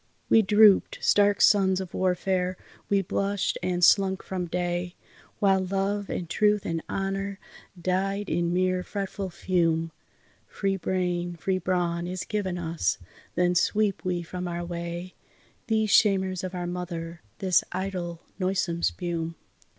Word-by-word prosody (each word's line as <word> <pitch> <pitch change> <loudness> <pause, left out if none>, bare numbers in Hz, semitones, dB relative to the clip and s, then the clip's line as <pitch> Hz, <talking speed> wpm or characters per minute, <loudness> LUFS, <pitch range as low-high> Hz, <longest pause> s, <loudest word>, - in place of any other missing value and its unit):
We 225 - +7
droop'd, 210 -1 +5
stark 205 0 +3
sons 190 -2 +5
of 185 -2 -6
warfare, 185 0 0 0.3
we 200 -1 +3
blushed 200 +2 -1
and 180 0 -1
slunk 190 +1 +4
from 185 -2 -3
day, 175 +1 -2 0.4
While 195 -2 +3
Love 195 +2 -1
and 175 - -3
Truth 210 +3 +2
and 165 -1 -2
Honour 195 +1 -2 0.4
died 195 +3 -1
in 170 -2 0
mere 185 0 +1
fretful 195 0 -4
fume. 165 -2 0 0.6
Free 195 -1 -1
brain, 175 -1 -1
free 185 +3 -1
brawn, 175 -1 -1
is 185 0 -4
given 195 -4 -2
us, 165 -1 -1 0.4
then 180 0 +2
sweep 205 +3 +1
we 180 -2 -1
from 180 +2 -5
our 175 0 -3
way 170 +1 -5 0.5
These 220 -2 +1
shamers 190 -3 +3
of 185 0 -4
our 175 -1 -3
mother, 170 -2 -5 0.2
this 185 -2 +3
idle, 180 -3 -4 0.2
noisome 185 -2 0
spume. 170 -2 -2
185 Hz, 135 wpm, -27 LUFS, 175-195 Hz, 0.6 s, We